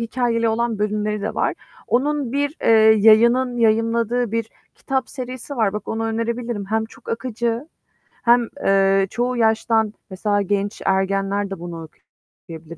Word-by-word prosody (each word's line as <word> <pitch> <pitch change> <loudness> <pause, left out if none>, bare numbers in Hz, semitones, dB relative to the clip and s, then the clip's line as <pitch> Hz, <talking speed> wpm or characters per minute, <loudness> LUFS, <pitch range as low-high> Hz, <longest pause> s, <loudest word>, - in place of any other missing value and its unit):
hikâyeli 230 -1 0
olan 225 -1 -1
bölümleri 210 0 -1
de 210 - -3
var. - - 0 0.3
Onun 275 0 0
bir, 285 +2 -1
eee, - - +1 0.3
yayının 235 +4 +4
yayınladığı 230 +1 +1
bir 230 -1 -1 0.3
kitap 265 -2 -2
serisi 255 +1 -7
var. 215 -4 +1
Bak 210 -1 -6
onu 225 0 -2
önerebilirim. 230 -1 -3
Hem 220 +2 0
çok 220 - -16
akıcı 235 +2 -3 0.6
hem, 240 0 +4 0.2
eee, 195 0 +3
çoğu 245 +3 -2
yaştan 220 -1 +2 0.2
mesela 205 +2 0
genç 200 +1 -2
ergenler 195 +1 0
de 195 -3 -6
bunu 170 -1 -7 0.7
okuyabilir. 165 0 -9
225 Hz, 140 wpm, -21 LUFS, 205-240 Hz, 0.7 s, yayının